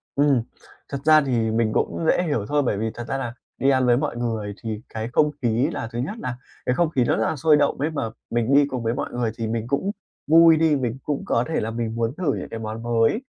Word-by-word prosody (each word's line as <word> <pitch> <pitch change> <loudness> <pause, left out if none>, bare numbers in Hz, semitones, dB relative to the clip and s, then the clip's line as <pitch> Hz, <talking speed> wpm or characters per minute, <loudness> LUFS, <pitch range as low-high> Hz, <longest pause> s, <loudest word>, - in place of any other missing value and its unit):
Ừm, 140 -3 +3 0.5
thật 140 - -3
ra 155 -1 +7
thì 115 -5 0
mình 110 -1 +1
cũng 165 - -1
dễ 180 - +3
hiểu 130 - -1
thôi, 145 +2 +1
bởi 105 -6 0
vì 110 +1 -2
thật 120 0 -7
ra 135 - -2
là 120 -3 -4 0.2
đi 135 - +2
ăn 130 -2 +3
với 120 -1 +4
mọi 125 - -2
người 110 -4 -2
thì 110 -1 -4
cái 110 0 -4
không 150 -1 +3
khí 120 +4 +1
là 115 - -4
thứ 120 - -4
nhất 155 - -3
là 125 - -4 0.3
cái 125 - +1
không 170 +1 +2
khí 130 -6 +1
nó - - +2
rất 110 - 0
là - - -2
sôi 150 +1 +4
động 145 -1 +1
ấy 150 +3 0
mà 140 -7 -2 0.2
mình 120 +3 0
đi 145 0 +6
cùng 125 -4 -4
với 115 +1 0
mọi - - -3
người 120 -2 -1
thì 115 - -2
mình 115 +1 -2
cũng 140 +9 0 0.4
vui 165 0 +7
đi, 160 -1 +3
mình 125 -3 -2
cũng 145 -2 -2
có 115 - +1
thể 160 - -1
là 110 +1 -3
mình 115 -1 -3
muốn 115 +1 -1
thử 160 -7 0
những - - -5
cái 115 - -6
món 110 +1 -5
mới, 120 - +2
125 Hz, 270 wpm, -23 LUFS, 115-145 Hz, 0.5 s, ra